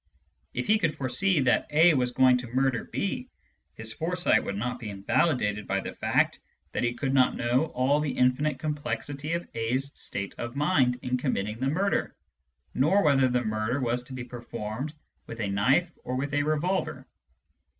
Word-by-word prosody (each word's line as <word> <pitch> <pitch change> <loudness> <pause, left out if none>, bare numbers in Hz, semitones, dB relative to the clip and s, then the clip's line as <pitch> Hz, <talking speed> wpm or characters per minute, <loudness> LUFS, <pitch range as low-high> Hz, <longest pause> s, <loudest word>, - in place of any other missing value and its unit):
If - - -1
he 215 -1 +4
could 165 -6 0
foresee 155 +6 +1
that 130 -2 +2
A 160 +3 +6
was 125 -3 +2
going 130 0 +4
to 125 - -6
murder 130 0 0
B, 250 +6 -3 0.5
his 110 0 -4
foresight 175 +6 +1
would 100 - -3
not 125 +3 -3
be 110 - -6
invalidated 105 +1 0
by - - 0
the - - -6
fact - - +1 0.3
that - - -2
he 120 0 0
could 135 +1 -1
not 130 -2 +4
know 125 +5 +1
all 140 0 +1
the 150 -1 -1
infinite 130 +4 +2
complexity 145 0 -3
of 170 +1 -2
A*s 125 +5 -1
state 100 -1 -5
of 120 +1 -5
mind 140 -5 +2
in 125 0 0
committing 110 -5 -2
the 130 - 0
murder, 195 +7 0 0.6
nor 185 +10 +3
whether 135 -4 +4
the 125 0 +1
murder 110 +4 -1
was 125 -1 0
to 130 - -10
be 130 -1 -5
performed 120 +2 -5 0.4
with 115 - -8
a 100 -3 -1
knife 135 - +2
or 125 - -3
with 140 +2 -2
a 145 - +2
revolver. 155 +6 -1
130 Hz, 180 wpm, -27 LUFS, 120-150 Hz, 0.6 s, A